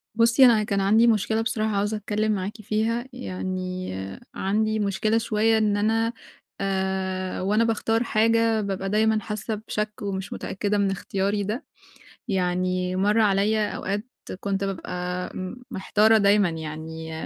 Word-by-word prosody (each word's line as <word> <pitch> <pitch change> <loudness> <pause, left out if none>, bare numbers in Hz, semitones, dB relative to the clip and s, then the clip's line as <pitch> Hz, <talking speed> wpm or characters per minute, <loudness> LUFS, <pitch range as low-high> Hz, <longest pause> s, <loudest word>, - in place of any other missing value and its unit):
بُصِّي، 230 +3 +6
أنا 225 -4 +5
كان 200 -2 0
عندي 220 +4 +5
مشكلة 220 0 +2
بصراحة، 220 -2 -1
عاوزة 205 +2 0
أتكلَّم 210 +1 -1
معاكِ 205 +2 -3
فيها. 225 +3 -1
يعني، 185 - -4 0.4
عندي 215 +3 0
مشكلة 210 +2 +1
شوية، 225 0 +2
إن 210 -2 +2
أنا 225 +2 +1 0.5
آآ، 190 -1 -1
وأنا 210 +4 +2
باختار 225 0 +1
حاجة، 225 0 +2
بابقى 195 -1 -3
دايمًا 220 +1 +3
حاسَّة 215 +1 -4
بشك 210 0 -1
ومش 195 -1 -4
متأكِّدة 205 +1 -2
من 200 -1 +2
اختياري 200 +2 -1
ده. 215 +6 -3 0.6
يعني، 185 -1 0
مَر 205 +4 +2
عليَّا 210 +1 +2
أوقات، 205 +3 -3 0.3
كنت 200 0 -2
بابقى 180 -1 -4 0.4
محتارة 215 +3 +3
دايمًا، 200 -2 +4
يعني، 160 0 -6
205 Hz, 130 wpm, -25 LUFS, 190-220 Hz, 0.6 s, بُصِّي